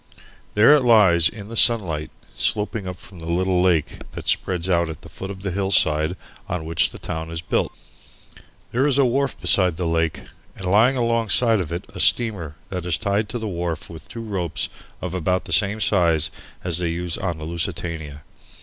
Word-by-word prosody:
There 105 +6 +7
it 150 -1 +6
lies 100 -8 +5
in 105 -2 -10
the 115 - -7
sunlight, 95 -11 +3 0.3
sloping 105 -1 0
up 90 - -4
from 95 -1 -14
the 80 - -8
little 90 +1 +1
lake 90 -4 +1
that - - -8
spreads 90 -1 0
out 85 -3 +1
at 80 - -8
the - - -11
foot 95 - -8
of 95 -1 -8
the 95 - -2
hillside 85 -4 +2 0.3
on 90 -4 -3
which 80 +1 +2
the - - -11
town 80 0 -5
is 85 0 -4
built. - - -1 1.0
There 130 +4 +2
is 140 -2 +2
a 140 - +5
wharf 135 +2 0
beside 90 -4 +3
the 90 - -2
lake, 80 -1 0 0.3
and 95 - -7
lying 110 +8 +4
alongside 115 -1 +2
of 85 - -6
it 85 +1 -4
a - - -8
steamer 95 -11 +3
that 90 -2 -4
is 85 -2 +1
tied 100 0 -1
to 120 - -3
the 110 -2 -4
wharf 85 -4 -4
with 80 - -11
two 115 - -7
ropes 90 -7 -2 0.3
of 90 -1 -4
about 90 +1 -1
the - - -3
same 105 +1 +2
size 85 -8 +2 0.3
as 90 -2 -1
they 85 -2 -1
use 85 0 -2
on 85 -4 -3
the 80 - -8
Lusitania. 80 -3 -4
90 Hz, 195 wpm, -22 LUFS, 85-105 Hz, 1.0 s, There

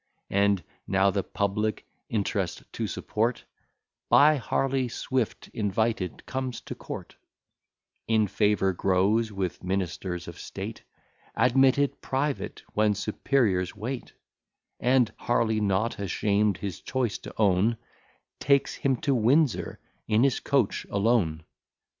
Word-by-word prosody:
And 100 -1 +2 0.2
now, 95 0 +3
the 100 - 0
public 105 +3 -2 0.2
Int'rest 100 -4 -1
to - - -2
support, 115 +3 -1 0.7
By 150 +1 +6
Harley 135 0 0
Swift 125 0 -2
invited, 110 -2 -1
comes 130 -2 -3
to - - -7
court; - - -8 0.9
In 110 -1 +3
favour 105 -1 +2
grows 100 +5 +2
with 95 -3 -3
ministers 90 -1 -3
of 85 - -9
state; - - -6 0.5
Admitted 135 +4 +3
private, 135 +1 -2
when 105 -1 +3
superiors 105 -3 0
wait: 120 +5 -5 0.7
And 125 -1 +3
Harley, 110 -2 +1
not 105 +3 0
ashamed 100 +1 +1
his 100 -3 -5
choice 125 -6 -1
to - - -10
own, 105 +2 +3 0.6
Takes 140 0 +2
him 135 -1 +1
to 140 - +2
Windsor 130 +3 +2 0.3
in 110 +2 +3
his 135 -2 +2
coach 135 -7 +1
alone. 100 -7 +1
110 Hz, 115 wpm, -27 LUFS, 100-125 Hz, 0.9 s, By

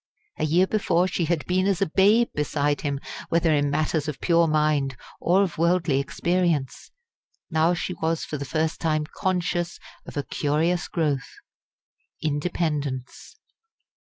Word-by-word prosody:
A - - +1
year 170 +5 +4
before 185 -3 +1
she 175 -2 -1
had 165 -1 -1
been 185 +1 +1
as 195 -3 +1
a 195 - +3
babe 205 +7 +4
beside 145 0 0
him, 140 -2 -2 0.3
whether 165 -1 +3
in 145 -1 +2
matters 155 +1 0
of 150 -3 -4
pure 170 -1 +3
mind 150 -4 +1 0.2
or 185 +4 +3
of 175 -5 -4
worldly 170 -4 +2
experience. 170 -1 -1 0.6
Now 160 +2 +3
she 180 - -3
was 165 -1 -1
for 150 - -5
the - - -3
first 155 +4 -1
time 155 -2 +1
conscious 175 0 -2 0.3
of - - -8
a 145 - 0
curious 160 +6 0
growth 150 -6 -1 0.9
independence. 145 - -3
160 Hz, 145 wpm, -25 LUFS, 145-175 Hz, 0.9 s, year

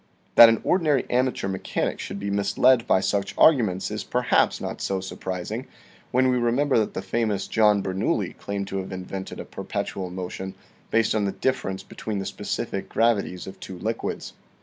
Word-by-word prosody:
That 115 - +10
an 115 - +1
ordinary 155 -7 +2
amateur 125 -5 +1
mechanic 95 -1 -2
should 100 - -5
be 100 0 -3
misled 115 +5 +3
by 95 - +4
such 100 0 -1
arguments 110 - +4
is - - -3
perhaps - - +2
not - - -5
so 95 -1 -1
surprising, 95 +5 -5 0.4
when 130 +1 +3
we 125 - +2
re 120 -1 +2
member 140 0 +2
that 110 - -1
the - - -3
famous 110 -4 -1
John 105 -2 +3
Bernoulli 95 +1 -1
claimed 100 -1 -4
to 95 - -3
have 95 0 -4
invented 95 +1 -6
a - - -6
perpetual 95 -2 -4
motion 95 +1 -6 0.3
based 115 0 +2
on 105 -2 +1
the 100 - 0
difference 95 -7 -2
be - - -14
tween 110 -2 -3
the 95 - -3
specific 95 - -4
gravities 105 -6 +1
of 95 - -10
two 95 - -8
liquids. 110 +5 -3
100 Hz, 180 wpm, -25 LUFS, 95-120 Hz, 0.4 s, That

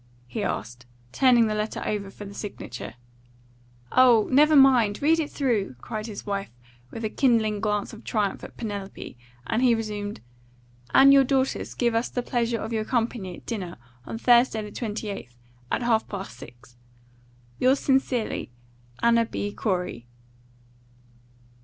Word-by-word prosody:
he 120 - -5
asked, 120 +4 -4 0.2
turning 245 - +5
the 215 - -1
letter 215 +1 -2
over 200 -2 -2
for 205 +1 -10
the 200 - -9
signature. 125 - -7 1.0
"Oh, 245 -4 +5
never 300 +3 +5
mind. 250 -7 +5
Read 320 +3 +3
it 300 -2 -1
through!" 225 - -1
cried 215 - -5
his 210 -3 -8
wife, 200 -1 -3 0.4
with 225 - -6
a - - +2
kindling 220 -5 +2
glance 210 -1 -1
of 220 - -11
triumph 205 -3 -1
at - - -10
Penelope, 200 - -6 0.3
and 225 - 0
he 245 -2 +5
resumed 210 -2 -4 0.4
" 120 0 -31
and 275 +1 +8
your 275 -1 +7
daughters 265 0 -1
give 235 -2 +1
us 230 +2 0
the 245 - -3
pleasure 235 -2 -1
of 220 +1 -5
your 220 -1 0
company 225 -6 -2
at - - -16
dinner 190 -7 -5 0.3
on - - -5
Thursday, 240 -2 +4
the 210 - -8
28th, 205 - -5 0.4
at - - 0
half 225 -2 +2
past 195 - -6
six. 120 0 -14 0.8
"Yours 260 +2 +3
sincerely, 260 - 0 0.5
"ANNA 235 0 +4
B. 205 -2 -4
COREY." 180 - -2
220 Hz, 155 wpm, -25 LUFS, 200-245 Hz, 1.0 s, and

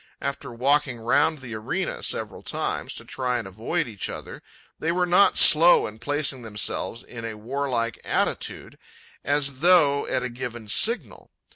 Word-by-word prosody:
After 140 -2 -4
walking 135 +1 +1
round 140 +6 +1
the 120 -3 -8
arena 130 - -3
several - - -2
times, - - -3
to - - -7
try 125 -2 -2
and 115 - -5
avoid 115 - -2
each 105 -4 -5
other, - - -8 0.4
they 160 - 0
were 180 +1 +1
not 180 +3 +4
slow 165 +3 +7
in 110 +1 -8
placing 145 0 0
themselves 110 +1 -1
in 115 -2 -10
a 115 -1 -5
warlike 120 -1 -3
attitude, - - -3 0.4
as 140 -2 -1
though 155 -4 +4
at - - -1
a 125 - -3
given 120 -2 -7
signal. 230 - +1
130 Hz, 155 wpm, -24 LUFS, 115-150 Hz, 0.4 s, slow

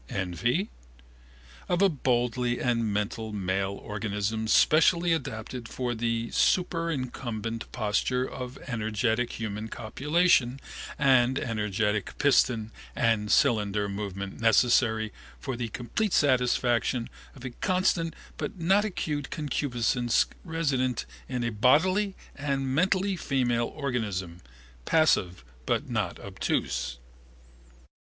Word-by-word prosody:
Envy? 120 - -1 1.0
Of 175 +2 +2
a - - +7
bodily 125 - 0
and 115 -3 0
mental 105 +2 -2
male 95 -1 -1
organism 105 +1 -2
specially 165 +7 +4
adapted 120 -4 -4
for 125 -1 -2
the 115 0 -2
superincumbent 130 - -1
posture 125 +3 0
of 125 +1 -7
energetic 115 0 -1
human 110 -1 -4
copulation 135 +3 +1 0.4
and 130 -2 +4
energetic 105 -3 -1
piston 120 -5 +3 0.2
and 110 -3 +1
cylinder 105 -2 +3
movement 100 0 -5
necessary 110 0 +3 0.3
for 135 -3 -4
the 120 -1 -3
complete 150 - -2
satisfaction 125 -3 +2 0.3
of 130 -1 -11
a 130 - -4
constant 175 +1 0 0.2
but - - -4
not 190 +4 +3
acute 150 -8 -3
concupiscence 125 -5 0 0.2
resident 140 -8 -1 0.2
in 125 -2 -2
a 120 - -1
bodily 185 - +3 0.2
and 135 -2 -1
mental 185 +5 +2
female 120 -6 0
organism, 105 - -3 0.4
passive 95 - +2 0.2
but - - 0
not - - -1
obtuse. 60 0 -2
120 Hz, 100 wpm, -28 LUFS, 110-145 Hz, 1.0 s, a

